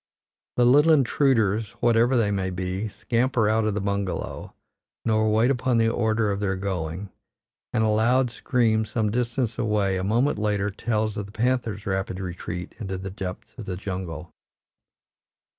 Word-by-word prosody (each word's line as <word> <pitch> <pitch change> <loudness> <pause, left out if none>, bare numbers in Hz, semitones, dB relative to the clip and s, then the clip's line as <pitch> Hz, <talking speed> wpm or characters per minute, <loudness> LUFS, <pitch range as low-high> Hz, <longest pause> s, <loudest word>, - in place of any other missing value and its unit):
The 120 - +5
little 145 +6 +6
intruders, 115 -6 +2
whatever 120 +2 +3
they 105 -3 +2
may 95 -2 -1
be, 95 +3 -3
scamper 115 +1 0
out 110 +1 +2
of 105 -2 0
the - - 0
bungalow, 100 -1 -3 0.5
nor 110 -1 +2
wait 115 +4 +3
upon 130 -2 +1
the 115 0 +3
order 110 -2 +1
of 100 - -2
their 100 -1 0
going, 95 -1 -4 0.6
and 110 - +1
a - - +3
loud 120 +4 +3
scream 115 -3 +1
some 110 -1 -1
distance 120 0 -1
away 105 -4 +1
a 95 - -2
moment 115 +6 +1
later 105 -1 0
tells 110 0 -1
of 100 -1 -4
the - - -13
panther's 115 -2 -1
rapid 95 -1 -2
retreat 90 -1 -5
into 95 -4 -4
the 95 +1 -6
depths 95 -1 -7
of - - -6
the 90 -1 -4
jungle. 90 -4 -5
105 Hz, 160 wpm, -25 LUFS, 95-115 Hz, 0.6 s, little